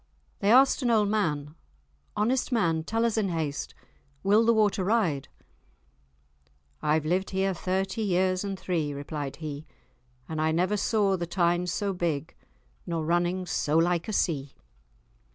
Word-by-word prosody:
They 200 +1 +2
asked 265 +4 +5
an 245 - +1
old 215 -3 +3
man, 150 -9 -1 0.6
"Honest 245 +6 +1
man, 165 -9 +1
tell 225 +6 0
us 230 -1 0
in 200 -3 0
haste, 155 -4 -3 0.5
will 205 +3 +4
the 230 - +4
water 210 -3 +2
ride?" 180 - +1 1.5
"I've 155 0 +1
lived 185 +4 0
here 190 0 0
thirty 190 +4 -2
years 185 -2 +1
and 195 -2 -4
three," 160 -6 -1
replied 145 -1 -5
he, 155 -1 -7 0.6
"and 160 -1 -3
I 160 0 +2
never 180 +5 +1
saw 205 -1 +1
the 170 -1 -4
Tyne 175 0 +1
so 195 +3 -1
big, 165 -4 -2 0.5
nor 165 -2 -2
running 175 +2 0
so 155 -2 0
like 170 +2 +2
a 215 - -3
sea." 145 -8 -1
180 Hz, 150 wpm, -27 LUFS, 160-205 Hz, 1.5 s, asked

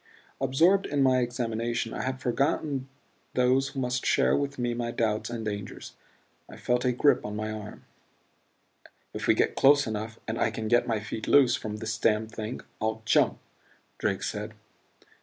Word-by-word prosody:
Absorbed 165 +9 +3
in 145 -2 +1
my 130 -1 +4
examination 120 -2 -2
I - - -3
had 130 0 -3
forgotten 135 +1 -1 0.5
those 130 +2 +3
who 135 - -6
must 125 0 -1
share - - +3
with 140 0 -2
me 120 -1 -1
my 120 0 -3
doubts 110 -2 -1
and 115 -2 -5
dangers. 100 -2 -6 0.6
I - - -11
felt 125 0 0
a 125 - +3
grip 135 +4 +3
on 105 0 -5
my 110 +1 -3
arm. 105 -1 -8 1.3
"If - - -4
we - - +5
get - - +2
close 145 +1 +5
enough 110 +1 -5
and 110 - -3
I - - +2
can 110 -1 -4
get 120 +2 +3
my 110 -3 0
feet 110 +1 -6
loose 135 -4 +5
from 105 -1 -5
this 110 +1 -4
damned 110 0 +1
thing 110 +2 -5 0.2
I'll 110 0 -2
jump," - - +3 0.6
Drake - - -1
said. - - -4
120 Hz, 175 wpm, -28 LUFS, 110-130 Hz, 1.3 s, we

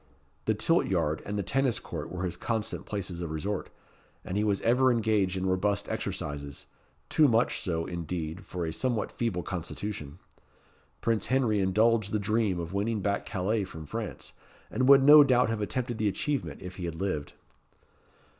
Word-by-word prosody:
The - - +2
tilt - - +2
yard 75 +1 0
and 105 +1 -2
the 100 - -1
tennis 130 +5 +1
court - - -6
were 90 0 -3
his 90 - -2
constant 110 -2 -3
places 95 -4 -4
of 85 - -3
resort, 80 +7 -3 0.6
and 90 - -4
he 105 - +2
was 100 -2 +1
ever 130 +3 +4
engaged 105 -5 +1
in 95 - -2
robust 100 +2 +1
exercises 70 -1 -4 0.4
too 155 - +4
much 115 -1 +2
so, 85 -5 -2
indeed, 85 0 -4
for 90 -2 -4
a 80 - -3
somewhat 120 -1 -1
feeble 100 -7 -2
constitution. 85 -3 -5 0.8
Prince 115 -2 0
Henry 125 -5 +2
indulged 110 +2 +2
the 110 - +1
dream 105 -2 0
of 85 +1 -5
winning 105 +2 0
back 100 +1 -1
Calais 105 +2 0
from 80 -4 -8
France, - - -6 0.4
and 130 +1 +1
would 140 -1 +8
no 150 +1 +10
doubt 125 -4 +3
have 115 -1 -2
attempted 120 +2 -2
the 105 - +2
achievement 140 +3 -2
if 90 0 -8
he 90 - -4
had 85 -1 -4
lived. 85 -5 -3
100 Hz, 175 wpm, -29 LUFS, 90-115 Hz, 0.8 s, no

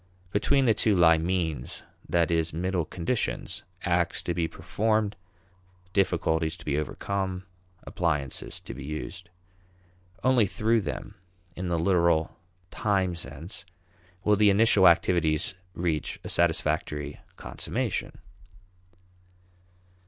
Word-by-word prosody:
Between 135 +7 +2
the 115 - +5
two 105 0 +2
lie 80 -2 +6
means 80 -6 -2 0.3
that 85 -1 +2
is 80 -1 +1
middle 90 0 -1
conditions: 90 +10 -2 0.2
acts 85 -1 +1
to 85 - -1
be 85 -1 0
performed; 110 +3 0 0.8
difficulties 80 -4 +1
to 85 - -13
be 70 - 0
overcome; 95 +3 -3 0.4
appliances 75 -6 -2
to - - -8
be 65 +2 -8
used. 80 +4 -6 0.9
Only 125 -5 +4
through 110 +3 +1
them, 85 +4 -5 0.4
in 90 +1 -4
the 85 -1 0
literal 85 -2 +2 0.4
time 95 -4 +1
sense, 85 - -8 0.6
will 105 - +4
the 105 0 +5
initial 100 -2 +6
activities 85 -2 +3 0.2
reach 85 -3 -1
a - - -6
satisfactory 75 -3 0 0.2
consummation. - - -3
85 Hz, 110 wpm, -27 LUFS, 80-100 Hz, 0.9 s, lie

